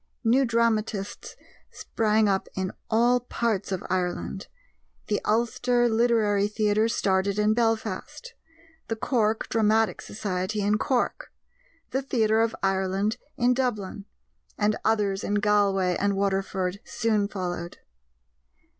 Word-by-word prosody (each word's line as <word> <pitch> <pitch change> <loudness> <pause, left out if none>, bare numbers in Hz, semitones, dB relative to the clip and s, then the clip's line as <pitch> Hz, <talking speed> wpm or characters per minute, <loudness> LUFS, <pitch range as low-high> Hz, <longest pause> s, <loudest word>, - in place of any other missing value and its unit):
New 250 +4 +4
dramatists 225 -3 -1 0.3
sprang 215 -1 +1
up 195 -1 0
in 190 0 -2 0.2
all 240 +2 +3
parts 230 -5 -2
of 190 - -2
Ireland; 185 +1 -2 0.6
The 210 - 0
Ulster 240 +2 +2
Literary 220 -3 +2
Theatre 215 +1 +1
started 195 -2 0
in 210 +1 +3
Belfast; 230 - -2 0.5
The 225 - -2
Cork 220 -2 0
Dramatic 220 0 +2
Society, 200 0 -3
in 210 +1 +1
Cork; 250 0 -1 0.6
The 265 - 0
Theatre 225 -5 +2
of 230 0 0
Ireland, 195 +3 0 0.2
in 245 +1 +3
Dublin; 215 -6 -2 0.5
and 210 0 +2
others 205 -3 +1
in 205 - -1
Galway 200 -3 +2
and 200 0 +1
Waterford 195 -1 -1
soon 220 -4 0
followed. 175 -3 -5
210 Hz, 115 wpm, -26 LUFS, 195-230 Hz, 0.6 s, New